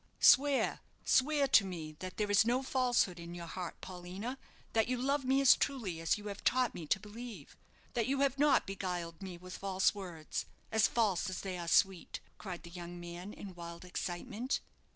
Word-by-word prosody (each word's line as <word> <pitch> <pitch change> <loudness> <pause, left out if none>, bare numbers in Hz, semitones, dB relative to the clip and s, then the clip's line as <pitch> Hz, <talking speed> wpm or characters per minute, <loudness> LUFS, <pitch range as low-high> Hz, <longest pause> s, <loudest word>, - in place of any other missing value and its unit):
"Swear 280 0 +5 0.3
swear 285 +1 +4
to 225 - +7
me 170 -5 -5
that 185 0 -6
there 210 -1 0
is 205 - +6
no 245 +4 +1
falsehood 245 -9 +2
in 170 +1 -7
your 170 -1 -6
heart, 175 0 -6
Paulina; 185 +8 -6 0.3
that 225 -1 +3
you 255 0 0
love 275 +2 0
me 265 +1 +3
as 275 - +8
truly 225 -12 -2
as 165 - +2
you 210 - -10
have 200 -1 -6
taught 255 -1 +3
me 165 -3 -7
to 190 - +2
believe; 210 - -9 0.4
that 235 -1 +1
you 275 +1 +1
have 275 -1 +2
not 295 0 +5
beguiled 180 -3 -4
me 185 -2 -6
with 180 +1 -9
false 190 -1 +2
words, 175 -6 -5 0.2
as 220 -1 +5
false 210 -7 +1
as 185 - -4
they 190 -2 -4
are 175 -1 -5
sweet!" 190 +1 +2 0.2
cried 180 -5 -6
the 170 - -10
young 175 0 -7
man, 175 +3 -7
in 200 -3 -9
wild 170 0 -8
excitement. 205 +8 -3
195 Hz, 195 wpm, -34 LUFS, 175-245 Hz, 0.4 s, as